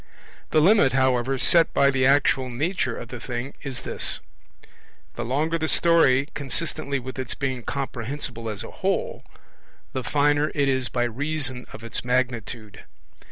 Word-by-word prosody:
The 155 Hz, -, +3 dB
limit, 185 Hz, -, +5 dB
however, 130 Hz, 0 st, +2 dB
set 165 Hz, +5 st, +4 dB
by 140 Hz, 0 st, +5 dB
the 130 Hz, -1 st, +2 dB
actual 135 Hz, -2 st, +3 dB
nature 130 Hz, -1 st, -1 dB
of 115 Hz, -, -8 dB
the 125 Hz, -, -7 dB
thing 120 Hz, +3 st, -5 dB
is 135 Hz, -4 st, -6 dB
this: -, -, -3 dB, 0.9 s
the 120 Hz, -, -4 dB
longer 155 Hz, +7 st, 0 dB
the 160 Hz, -, 0 dB
story, 150 Hz, -6 st, +4 dB
consistently 145 Hz, 0 st, -3 dB
with 130 Hz, +1 st, -7 dB
its 130 Hz, -2 st, -3 dB
being 130 Hz, -3 st, -2 dB
comprehensible 125 Hz, -2 st, -4 dB
as 105 Hz, -2 st, -5 dB
a -, -, -9 dB
whole, -, -, -2 dB, 0.7 s
the 130 Hz, -, -3 dB
finer 145 Hz, +2 st, +2 dB
it 140 Hz, -2 st, +2 dB
is 130 Hz, -2 st, 0 dB
by 120 Hz, -, 0 dB
reason 135 Hz, +1 st, 0 dB
of 115 Hz, -, -10 dB
its 115 Hz, -, -2 dB
magnitude. 120 Hz, -4 st, -2 dB
130 Hz, 155 wpm, -24 LUFS, 125-145 Hz, 0.9 s, limit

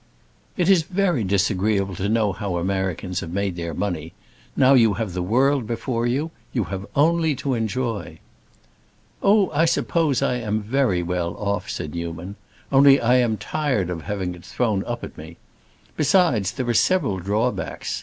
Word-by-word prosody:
"It 175 Hz, -2 st, +1 dB
is 190 Hz, -3 st, +5 dB
very 180 Hz, -, 0 dB
disagreeable 100 Hz, 0 st, +1 dB
to 100 Hz, +2 st, -1 dB
know 110 Hz, -3 st, +2 dB
how 100 Hz, -1 st, -4 dB
Americans 95 Hz, 0 st, -2 dB
have 85 Hz, -, -6 dB
made 100 Hz, -1 st, -1 dB
their 85 Hz, -2 st, -5 dB
money. 85 Hz, -4 st, -3 dB, 0.4 s
Now 135 Hz, 0 st, +6 dB
you 115 Hz, -6 st, +5 dB
have 100 Hz, -2 st, -3 dB
the 90 Hz, -, -2 dB
world 130 Hz, +6 st, +2 dB
before 120 Hz, 0 st, -2 dB
you. 145 Hz, +7 st, -1 dB, 0.2 s
You 120 Hz, -, +1 dB
have 95 Hz, +1 st, -5 dB
only 160 Hz, +1 st, +3 dB
to 135 Hz, 0 st, -2 dB
enjoy." 115 Hz, -1 st, -3 dB, 1.0 s
"Oh, 200 Hz, -1 st, +4 dB
I 160 Hz, +2 st, +3 dB
suppose 165 Hz, -4 st, +1 dB
I 125 Hz, -, +1 dB
am 110 Hz, -2 st, -2 dB
very 110 Hz, -6 st, +1 dB
well 85 Hz, 0 st, -2 dB
off," 100 Hz, -1 st, -2 dB
said 75 Hz, -, -5 dB
Newman. 85 Hz, +3 st, -5 dB, 0.4 s
"Only 140 Hz, 0 st, +6 dB
I 125 Hz, +2 st, +3 dB
am 120 Hz, -3 st, +1 dB
tired 130 Hz, -, -1 dB
of 85 Hz, -2 st, -4 dB
having 95 Hz, -1 st, -3 dB
it 90 Hz, -1 st, -13 dB
thrown 110 Hz, -6 st, -1 dB
up 120 Hz, 0 st, -4 dB
at -, -, -8 dB
me. 80 Hz, +2 st, -10 dB, 0.6 s
Besides, 140 Hz, -, +2 dB
there 130 Hz, -, -3 dB
are 120 Hz, -, +1 dB
several 125 Hz, -, +2 dB
drawbacks. 105 Hz, +7 st, -2 dB
110 Hz, 165 wpm, -23 LUFS, 95-135 Hz, 1.0 s, Now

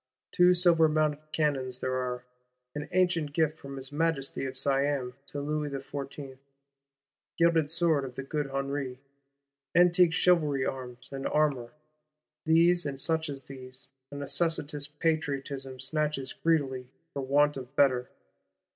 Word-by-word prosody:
Two 180 Hz, 0 st, +5 dB
silver 170 Hz, -3 st, +5 dB
mounted 155 Hz, -1 st, +1 dB
cannons 135 Hz, -5 st, 0 dB
there 130 Hz, -, -2 dB
are; 125 Hz, -1 st, -2 dB, 0.5 s
an 150 Hz, +1 st, -5 dB
ancient 175 Hz, -5 st, +1 dB
gift 160 Hz, -1 st, +1 dB
from 140 Hz, 0 st, -8 dB
his 135 Hz, +1 st, -7 dB
Majesty 150 Hz, -3 st, -1 dB
of 130 Hz, 0 st, -5 dB
Siam 135 Hz, -2 st, 0 dB
to 145 Hz, -, -5 dB
Louis 150 Hz, +1 st, -2 dB
Fourteenth: 135 Hz, -1 st, -7 dB, 1.0 s
gilt 165 Hz, -3 st, +3 dB
sword 165 Hz, -3 st, +2 dB
of 130 Hz, -2 st, -7 dB
the 135 Hz, -, -4 dB
Good 145 Hz, 0 st, -2 dB
Henri; 135 Hz, -1 st, -3 dB, 0.8 s
antique 175 Hz, 0 st, +6 dB
Chivalry 150 Hz, -8 st, +3 dB
arms 125 Hz, -2 st, -6 dB
and 135 Hz, 0 st, -3 dB
armour. 140 Hz, -6 st, +1 dB, 0.7 s
These, 170 Hz, +1 st, +4 dB
and 135 Hz, -1 st, -4 dB
such 160 Hz, +1 st, 0 dB
as 135 Hz, -1 st, -6 dB
these, 130 Hz, -1 st, -9 dB, 0.2 s
a -, -, -9 dB
necessitous 145 Hz, 0 st, -1 dB
Patriotism 140 Hz, -4 st, -2 dB
snatches 140 Hz, 0 st, -1 dB
greedily, 135 Hz, -6 st, 0 dB, 0.3 s
for 140 Hz, -, -3 dB
want 145 Hz, +2 st, +3 dB
of 130 Hz, 0 st, -8 dB
better. 130 Hz, -3 st, +3 dB
145 Hz, 135 wpm, -29 LUFS, 135-160 Hz, 1.0 s, antique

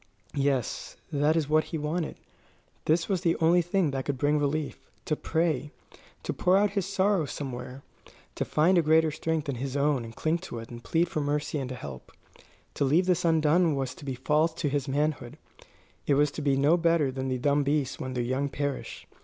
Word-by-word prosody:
Yes; 135 Hz, -4 st, -1 dB, 0.2 s
this 150 Hz, +2 st, +2 dB
was 160 Hz, -4 st, +1 dB
what 155 Hz, +1 st, +3 dB
he 165 Hz, -, -4 dB
wanted 155 Hz, +2 st, -2 dB, 0.7 s
this 165 Hz, +2 st, +2 dB
was 190 Hz, -4 st, 0 dB
the 170 Hz, -2 st, +2 dB
only 170 Hz, +2 st, +4 dB
thing 175 Hz, -2 st, +1 dB
that 135 Hz, -1 st, -3 dB
could 140 Hz, -2 st, -2 dB
bring 145 Hz, +2 st, +2 dB
relief: 145 Hz, +1 st, -2 dB, 0.2 s
to 155 Hz, -, 0 dB
pray; 160 Hz, -3 st, 0 dB, 0.5 s
to -, -, -2 dB
pour 180 Hz, +1 st, +3 dB
out 205 Hz, 0 st, +3 dB
his 200 Hz, -2 st, -1 dB
sorrow 195 Hz, -3 st, +2 dB
somewhere; 130 Hz, -1 st, -6 dB, 0.5 s
to -, -, -2 dB
find 170 Hz, +4 st, +3 dB
a -, -, +5 dB
greater 160 Hz, 0 st, +4 dB
strength 160 Hz, 0 st, -2 dB
than 140 Hz, -4 st, -3 dB
his 135 Hz, +2 st, -3 dB
own 140 Hz, -3 st, +2 dB
and 115 Hz, 0 st, -9 dB
cling 160 Hz, +2 st, 0 dB
to 165 Hz, -9 st, -7 dB
it 115 Hz, +1 st, -8 dB
and 120 Hz, 0 st, -9 dB
plead 170 Hz, +1 st, +1 dB
for 155 Hz, -2 st, -2 dB
mercy 145 Hz, +1 st, -1 dB
and 130 Hz, -2 st, -4 dB
help. 70 Hz, -, -8 dB, 0.6 s
To -, -, -1 dB
leave 155 Hz, +7 st, +3 dB
this 180 Hz, -1 st, +1 dB
undone 160 Hz, 0 st, +3 dB
was 135 Hz, -2 st, -2 dB
to -, -, -14 dB
be 135 Hz, -2 st, -3 dB
false 155 Hz, +5 st, +1 dB
to 160 Hz, -3 st, -1 dB
his 140 Hz, 0 st, -1 dB
manhood; 140 Hz, -1 st, -1 dB, 0.7 s
it 140 Hz, -, +4 dB
was 145 Hz, 0 st, +3 dB
to 150 Hz, -, -6 dB
be 140 Hz, -2 st, +2 dB
no 145 Hz, +5 st, +4 dB
better 165 Hz, -5 st, +2 dB
than 130 Hz, 0 st, -4 dB
the 130 Hz, -1 st, -1 dB
dumb 145 Hz, +3 st, +2 dB
beasts 140 Hz, -2 st, 0 dB
when 130 Hz, -, -4 dB
their 120 Hz, -, 0 dB
young 130 Hz, +4 st, -1 dB
perish. 140 Hz, -1 st, -4 dB
150 Hz, 205 wpm, -28 LUFS, 135-165 Hz, 0.7 s, a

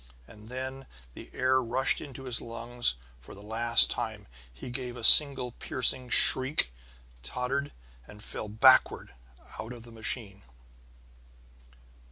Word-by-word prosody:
And 105 Hz, +1 st, -18 dB
then 130 Hz, +1 st, -9 dB, 0.3 s
the -, -, -15 dB
air 130 Hz, +1 st, -2 dB
rushed 125 Hz, +3 st, -2 dB
into 135 Hz, -3 st, -13 dB
his 125 Hz, -3 st, -3 dB
lungs 115 Hz, -, -3 dB, 0.2 s
for -, -, -17 dB
the 100 Hz, -, -17 dB
last 115 Hz, +2 st, +1 dB
time; -, -, -8 dB, 0.2 s
he 65 Hz, -, -13 dB
gave 125 Hz, -1 st, -9 dB
a 120 Hz, -, -12 dB
single 135 Hz, -1 st, +5 dB
piercing 125 Hz, +1 st, -4 dB
shriek, 130 Hz, -, +6 dB, 0.5 s
tottered, 125 Hz, -, -7 dB, 0.4 s
and 105 Hz, 0 st, -16 dB
fell 105 Hz, -, -9 dB
backward 120 Hz, +5 st, 0 dB, 0.5 s
out 115 Hz, +3 st, -10 dB
of 120 Hz, -2 st, -15 dB
the 120 Hz, -, -16 dB
machine. 110 Hz, -2 st, -7 dB
120 Hz, 130 wpm, -25 LUFS, 110-130 Hz, 0.5 s, shriek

